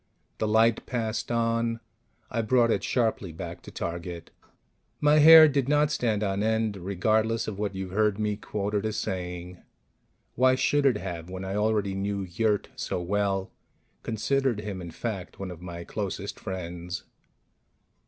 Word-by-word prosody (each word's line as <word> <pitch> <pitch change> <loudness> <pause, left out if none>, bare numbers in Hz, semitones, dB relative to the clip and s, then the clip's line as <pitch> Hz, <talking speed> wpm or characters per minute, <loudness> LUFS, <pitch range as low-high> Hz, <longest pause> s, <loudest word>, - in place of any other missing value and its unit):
The 110 - 0
light 110 +1 +3
passed 115 -2 -2
on. 115 0 0 0.5
I 115 - 0
brought 115 +1 +3
it - - 0
sharply 110 -7 0
back 85 +1 -7
to - - -11
target. 85 0 -5 0.7
My 150 +1 +5
hair 160 +1 +10
did 140 -2 0
not 150 0 +3
stand 110 -6 0
on 100 0 0
end, 110 -1 +1
regardless 110 +5 0
of 105 -2 -5
what 100 -2 -2
you've 95 -1 -5
heard 105 0 +2
me 105 -1 0
quoted 105 0 -2
as 110 -1 -2
saying. 90 -1 -4 0.7
Why 130 +1 +4
should 145 +2 +2
it 125 -5 +3
have, 85 -3 -6
when 95 +1 -6
I 95 - -3
already 105 -2 +1
knew 100 +1 -2
Yurt 100 +4 0
so - - -3
well 95 +1 -1 0.5
considered 125 +1 0
him, 100 -3 -5
in 85 - -7
fact, 95 +1 -5
one 95 -2 -5
of 85 -1 -10
my 85 -1 -7
closest - - -4
friends? 90 -1 -5
105 Hz, 155 wpm, -27 LUFS, 95-115 Hz, 0.7 s, hair